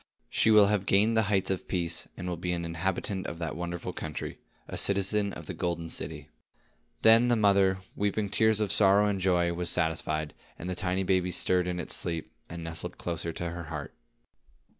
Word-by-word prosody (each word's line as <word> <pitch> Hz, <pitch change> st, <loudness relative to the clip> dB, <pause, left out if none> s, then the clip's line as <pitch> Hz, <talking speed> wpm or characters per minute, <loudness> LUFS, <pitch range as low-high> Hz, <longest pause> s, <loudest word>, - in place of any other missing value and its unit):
She -, -, +3 dB
will 105 Hz, -2 st, +7 dB
have 100 Hz, -1 st, 0 dB
gained 105 Hz, +4 st, +4 dB
the 110 Hz, -, +5 dB
heights 95 Hz, -2 st, +2 dB
of 95 Hz, -, -3 dB
Peace, 85 Hz, -3 st, -1 dB
and 90 Hz, -, -5 dB
will 90 Hz, -, -2 dB
be 90 Hz, +1 st, -2 dB
an 85 Hz, -1 st, -3 dB
inhabitant 95 Hz, +3 st, -2 dB
of -, -, -5 dB
that 80 Hz, -4 st, -4 dB
wonderful 85 Hz, +1 st, -4 dB
country, 75 Hz, -1 st, -6 dB, 0.3 s
a -, -, -6 dB
citizen 100 Hz, +1 st, +1 dB
of 85 Hz, -, -9 dB
the -, -, -5 dB
golden 85 Hz, -2 st, -3 dB
city." 75 Hz, -2 st, -4 dB, 0.7 s
Then 115 Hz, +2 st, +7 dB
the 120 Hz, -, +4 dB
mother, 100 Hz, -3 st, +4 dB, 0.2 s
weeping 105 Hz, +1 st, 0 dB
tears 110 Hz, +1 st, +3 dB
of 105 Hz, -2 st, 0 dB
sorrow 100 Hz, 0 st, +5 dB
and 100 Hz, -1 st, 0 dB
of -, -, -4 dB
joy, 90 Hz, -2 st, +2 dB
was 85 Hz, 0 st, -1 dB
satisfied, 80 Hz, -3 st, -1 dB, 0.2 s
and 90 Hz, -, -7 dB
the 90 Hz, -, -2 dB
tiny 90 Hz, +1 st, -1 dB
baby 90 Hz, -1 st, +1 dB
stirred 90 Hz, 0 st, +2 dB
in 90 Hz, 0 st, -2 dB
its 90 Hz, -, -2 dB
sleep, 85 Hz, -2 st, -3 dB, 0.2 s
and 85 Hz, 0 st, -7 dB
nestled 80 Hz, 0 st, -3 dB
closer 85 Hz, -1 st, -3 dB
to 85 Hz, +1 st, -4 dB
her 85 Hz, -1 st, -6 dB
heart. 75 Hz, -2 st, -6 dB
90 Hz, 200 wpm, -29 LUFS, 85-100 Hz, 0.7 s, will